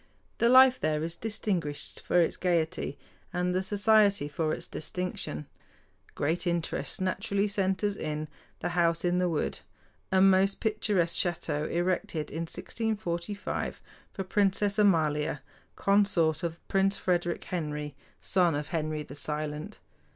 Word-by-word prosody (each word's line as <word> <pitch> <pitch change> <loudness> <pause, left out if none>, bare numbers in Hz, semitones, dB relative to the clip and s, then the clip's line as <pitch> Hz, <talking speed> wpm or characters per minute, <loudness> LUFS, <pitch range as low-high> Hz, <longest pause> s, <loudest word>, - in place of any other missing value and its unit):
The 235 - +4
life 260 0 +7
there 155 0 0
is 165 +1 -4
distinguished 190 -9 -2
for 175 - +2
its 170 - +2
gaiety, 165 -5 0 0.3
and 180 0 0
the 185 - +1
society 205 -3 +3
for 155 +1 -1
its - - -3
distinction. 155 - -4 0.7
Great 160 +5 0
interest 170 -1 -2
naturally 195 +2 0
centers 200 0 0
in 155 -3 -3 0.3
"The - - -1
House 170 -1 +1
in 175 0 +2
the 180 -1 +2
Wood," 160 -3 -1 0.5
a 190 - +4
most 195 +1 +4
picturesque 210 -6 +1
château 155 -3 -2
erected 175 -3 -1
in 165 +2 -3
1645 205 -4 -3 0.3
for 195 - -4
Princess 200 +1 +1
Amalia, 150 -7 +2 0.3
consort 190 -6 +2
of 170 -1 -5
Prince 195 0 +2
Frederick 175 -1 0
Henry, 150 -4 -4 0.3
son 175 -5 +2
of 145 +1 -3
Henry 155 -2 -2
the 140 - -11
Silent. 150 +5 -4
175 Hz, 130 wpm, -29 LUFS, 155-195 Hz, 0.7 s, life